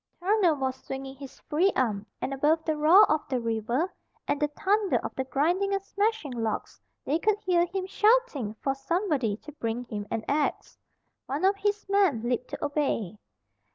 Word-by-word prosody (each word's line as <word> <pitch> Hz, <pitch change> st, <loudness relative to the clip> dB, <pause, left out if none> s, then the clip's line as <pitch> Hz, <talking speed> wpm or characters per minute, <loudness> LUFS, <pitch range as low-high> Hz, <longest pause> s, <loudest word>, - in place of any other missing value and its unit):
Turner 370 Hz, -3 st, +3 dB
was 265 Hz, -2 st, -2 dB
swinging 270 Hz, 0 st, -6 dB
his 275 Hz, -1 st, -11 dB
free 340 Hz, +6 st, +2 dB
arm, 215 Hz, -5 st, 0 dB, 0.2 s
and 275 Hz, -, -2 dB
above 305 Hz, +4 st, +2 dB
the 315 Hz, -, 0 dB
roar 325 Hz, +8 st, +7 dB
of 310 Hz, 0 st, +2 dB
the 255 Hz, -2 st, 0 dB
river 235 Hz, -, -1 dB, 0.3 s
and 285 Hz, -, 0 dB
the 295 Hz, -, +3 dB
thunder 395 Hz, +6 st, +1 dB
of -, -, -4 dB
the 265 Hz, -, -3 dB
grinding 350 Hz, +10 st, +1 dB
and 390 Hz, -, -3 dB
smashing 405 Hz, -6 st, -1 dB
logs 225 Hz, -3 st, -3 dB, 0.2 s
they 305 Hz, +4 st, +1 dB
could 425 Hz, +2 st, +2 dB
hear 350 Hz, -1 st, +3 dB
him 370 Hz, +1 st, -3 dB
shouting 420 Hz, -, +2 dB
for 270 Hz, -, +1 dB
somebody 275 Hz, -, -1 dB
to 300 Hz, -, -11 dB
bring 240 Hz, -4 st, -3 dB
him 210 Hz, -3 st, -6 dB
an 220 Hz, -, -3 dB
axe. 290 Hz, 0 st, -1 dB, 0.5 s
One 285 Hz, +7 st, -1 dB
of 390 Hz, +1 st, +4 dB
his 410 Hz, +1 st, -1 dB
men 390 Hz, -, +2 dB
leaped 245 Hz, +1 st, -1 dB
to -, -, -4 dB
obey. 250 Hz, -, -1 dB
295 Hz, 180 wpm, -27 LUFS, 255-380 Hz, 0.5 s, roar